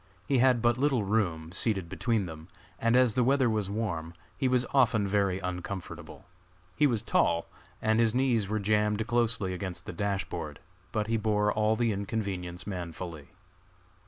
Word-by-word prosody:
He 135 -3 +3
had 125 -2 +4
but 120 +1 +3
little 135 -5 +2
room, 90 -6 0
seated 95 -1 +1
between 110 +2 0
them, 80 -2 -9 0.3
and 115 +1 +2
as 125 -3 +4
the 125 - +2
weather 135 +1 +3
was 105 -3 0
warm, 90 -6 -3 0.2
he 130 - 0
was 125 -1 +2
often 120 -6 +3
very 100 -2 +1
uncomfortable. 90 0 -6 0.5
He 150 - +4
was 115 -6 -1
tall, 85 0 +2 0.4
and 110 +1 +3
his 115 0 +3
knees 125 -6 +2
were 110 - 0
jammed 105 +1 +1
closely 115 -5 +1
against 90 -1 -5
the - - -6
dash 100 -2 -1
board; 75 -4 -6 0.3
but 110 -1 0
he 115 +1 0
bore 105 -1 +1
all 110 +1 +2
the 115 0 +1
inconvenience 95 -4 -3
manfully. 85 -5 -6
105 Hz, 165 wpm, -29 LUFS, 95-115 Hz, 0.5 s, had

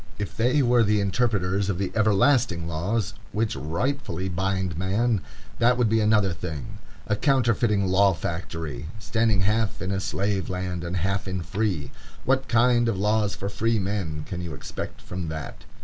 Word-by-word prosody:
If 105 - -5
they 130 +5 +3
were 120 -1 +4
the 105 -1 +3
interpreters 100 -2 +1
of 95 - 0
the 95 0 -2
everlasting 110 -4 +3
laws 95 +7 -1 0.2
which 110 -4 0
rightfully 90 - -2
bind 95 0 -1
man, 100 +5 +1 0.4
that 125 +1 +4
would 120 -3 +3
be 110 +1 +3
another 105 -3 +3
thing. 90 +5 -6 0.3
A 105 - +1
counterfeiting 115 -5 +2
law 95 0 +4
factory, 80 -4 -4
standing 110 -2 +1
half 105 +2 +1
in 95 +2 -3
a 95 - 0
slave 95 -2 -1
land 90 -1 -3
and 85 +2 -2
half 95 +3 -1
in 95 -1 -2
a - - -5
free! 95 -6 -2 0.3
What 130 +1 +2
kind 120 0 +4
of 105 - -1
laws 105 +1 +1
for 100 - -4
free 115 +3 0
men 95 -7 -2
can 90 -1 -4
you 85 -4 -5
expect - - -7
from 90 -2 -5
that? 80 -1 -6
100 Hz, 170 wpm, -25 LUFS, 90-115 Hz, 0.4 s, were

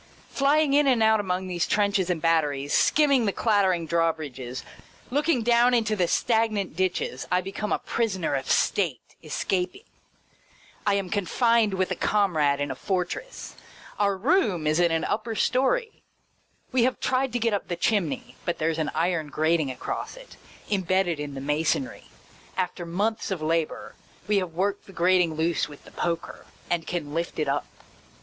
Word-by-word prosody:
Flying 285 +1 +3
in 290 0 +4
and 245 -4 +4
out 220 0 +4
among 185 -2 -2
these 175 -1 -1
trenches 200 -3 +1
and 175 -2 0
batteries, 150 -4 +1
skim 300 -1 +4
ming 255 -4 +4
the - - +2
clattering 190 -6 +2
drawbridges, 155 -7 -2 0.5
looking 290 -2 +1
down 240 +1 +4
into 220 -2 +1
the 180 -4 +1
stagnant 220 -4 +1
ditches, 180 -8 -1
I 180 0 +3
become 195 +3 -4
a - - +3
prisoner 190 -10 -1
of 135 -1 -2
state, 165 - +1 0.2
escaping. 180 - -2 1.0
I 200 - +4
am 195 -2 -2
confined 215 +1 +2
with 185 0 -1
a - - 0
com 200 -4 +1
rade 145 -2 +2
in 145 -1 -2
a - - -4
fortress. 190 - -4 0.5
Our 200 -1 +2
room 210 - +1
is 155 +2 +2
in 175 -1 +4
an 165 0 0
upper 220 +2 -2
story. 440 - +1 0.7
We 255 -2 +2
have 255 +2 +1
tried 260 0 0
to - - +1
get 230 -1 +1
up 200 - -2
the 175 - -2
chimney, 170 - -1
but 175 - -2
there 165 +1 0
's 160 - -5
an 155 - 0
iron 165 -1 0
grating 155 0 +1
across 130 - -5
it, - - -13 0.3
imbedded 185 -4 +1
in 145 -1 -5
the 135 - -5
masonry. 160 - -1 0.5
After 180 -2 -2
months 210 +6 -1
of 190 -3 -2
labour, 165 0 -1 0.3
we 210 -1 +2
have 185 -4 -2
worked 200 +3 -1
the 195 - -13
grating 175 -2 +3
loose 160 -2 0
with 145 - -13
the - - -15
poker, 170 -1 -4 0.2
and 170 -2 0
can 155 -5 -4
lift 170 +1 -3
it 155 - 0
up. 140 +1 -1
185 Hz, 175 wpm, -26 LUFS, 160-220 Hz, 1.0 s, in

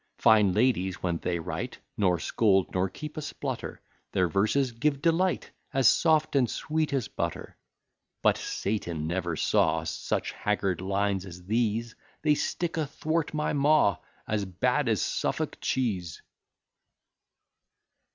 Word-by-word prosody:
Fine 105 -4 +5
ladies, 105 -5 +1
when 85 -2 0
they 90 -1 -1
write, 80 - -4 0.2
Nor 90 -4 +2
scold, 95 +3 +2
nor 95 +1 +1
keep 150 +9 -8
a - - -2
splutter: 150 - -5 0.3
Their 90 - +3
verses 110 - +1
give 140 +4 0
delight, 170 +4 +1 0.2
As 135 -4 +3
soft 155 +1 +3
and 125 -4 +3
sweet 155 +5 -1
as 135 -5 0
butter. - - -4 0.7
But - - +5
Satan 85 -6 -3
never 85 0 -1
saw - - +2
Such - - -2
haggard 100 -4 -1
lines 100 0 0
as 90 -2 -10
these: 115 +1 0 0.3
They 150 -1 +5
stick 165 +3 -2
athwart 155 +1 -1
my 150 - 0
maw, 145 -6 +4 0.3
As 105 -1 0
bad 125 +8 0
as 110 -4 +1
Suffolk - - -2
cheese. 95 -10 -2
110 Hz, 130 wpm, -28 LUFS, 95-145 Hz, 0.7 s, Fine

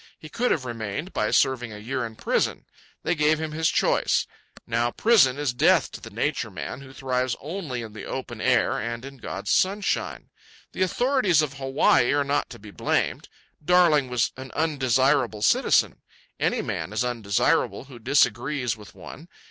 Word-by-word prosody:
He 155 - -12
could 240 +6 0
have 135 -5 0
remained 120 - -5
by 105 - 0
serving 125 -4 +1
a 105 - -8
year 120 +4 -3
in 110 - -13
prison. - - -1 0.4
They - - +1
gave 155 -1 +2
him 160 -1 -4
his 160 +1 +1
choice. - - +2 0.4
Now 115 +1 0
prison 150 - +4
is 145 -4 -1
death 120 - +3
to - - -9
the - - -9
Nature - - -2
Man, 135 - -6
who 135 -1 -12
thrives 130 -2 -1
only 150 -6 -5
in 110 -2 -9
the 110 - -8
open - - -6
air - - +2
and 115 +1 -4
in 135 0 -10
God's - - -5
sunshine. 200 +2 0 0.4
The - - -6
authorities 200 - +2
of 145 -2 -3
Hawaii 135 -2 +2
are 145 0 +2
not 140 +1 -1
to - - -10
be 105 0 -12
blamed. - - -1 0.3
Darling 155 -5 +4
was 125 -2 +1
an 130 0 -8
undesirable 130 -6 +1
citizen. - - +3 0.4
Any - - 0
man 105 - -4
is 110 +3 0
undesirable 115 -3 0
who 130 -3 -13
disagrees 130 -1 +1
with 105 -2 -14
one. 160 - -11
135 Hz, 170 wpm, -25 LUFS, 120-155 Hz, 0.4 s, prison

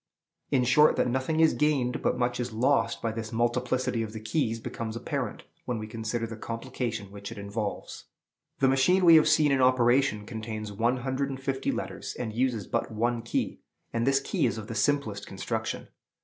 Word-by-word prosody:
In 130 -3 +3
short, 150 +5 +5
that - - +2
nothing 130 +6 0
is 160 - +5
gained, 140 -5 +1
but - - +1
much 120 0 0
is 125 0 -2
lost, 130 +6 +1
by 115 - 0
this 110 0 -5
multiplicity 120 +1 0
of 110 -1 -4
the 110 - -5
keys, 115 +1 -1
becomes 110 0 -5
apparent 115 - -3 0.2
when 125 - -2
we 110 - -5
consider 110 +1 -3
the 115 0 -6
complication 115 -3 -4
which 100 +1 -8
it 115 - -8
involves. 100 +1 -5 0.5
The 135 - +3
machine 135 +8 +4
we 165 -1 +9
have 155 - +5
seen 155 -2 +4
in 135 -1 +3
operation 125 -3 +3
contains 110 -2 -5
one 115 +5 +1
hundred 130 +2 -2
and 135 -1 -5
fifty 135 0 -1
letters, - - -5
and 115 -3 -4
uses 120 -3 0
but - - -1
one 115 +2 0
key; 115 - -2 0.3
and 115 +2 0
this 135 0 +4
key 135 - 0
is - - -2
of 110 - -6
the 115 - -6
simplest 110 -3 0
construction. 110 +3 -4
120 Hz, 190 wpm, -28 LUFS, 110-130 Hz, 0.5 s, we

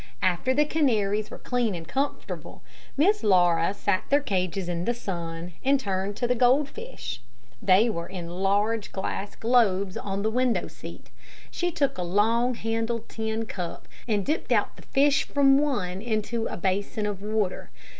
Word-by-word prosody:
After 185 +7 +2
the 295 +3 +3
canaries 215 -9 +1
were - - -8
clean 240 -5 -1
and 165 -1 -7
comfortable, 280 +2 -4 0.3
Miss 395 +9 +3
Laura 175 -4 +4
set 200 -1 0
their 285 - +5
cages 190 - -1
in 175 0 -2
the 240 - 0
sun, 170 -5 -5
and 275 +1 +4
turned 195 -2 -2
to 245 - 0
the 250 - +3
goldfish. 260 - 0 0.4
They 200 +2 +5
were 170 -7 -3
in 180 -3 -6
large 205 +3 +1
glass 195 +1 -4
globes 200 -6 +2
on 200 0 -3
the 220 - +1
window 250 0 +1
seat. - - -11 0.4
She 355 - -1
took 285 - 0
a - - 0
long 225 +7 +2
handled 225 0 -2
tin 220 0 -2
cup, 180 -5 -6 0.2
and 210 -4 +1
dipped 305 +3 -1
out - - +2
the - - -14
fish 285 +2 +3
from 275 -1 +4
one 205 -11 -1
into 225 0 -1
a - - -5
basin 200 +4 -1
of 205 -2 -3
water. 210 -2 -2
215 Hz, 165 wpm, -26 LUFS, 190-250 Hz, 0.4 s, their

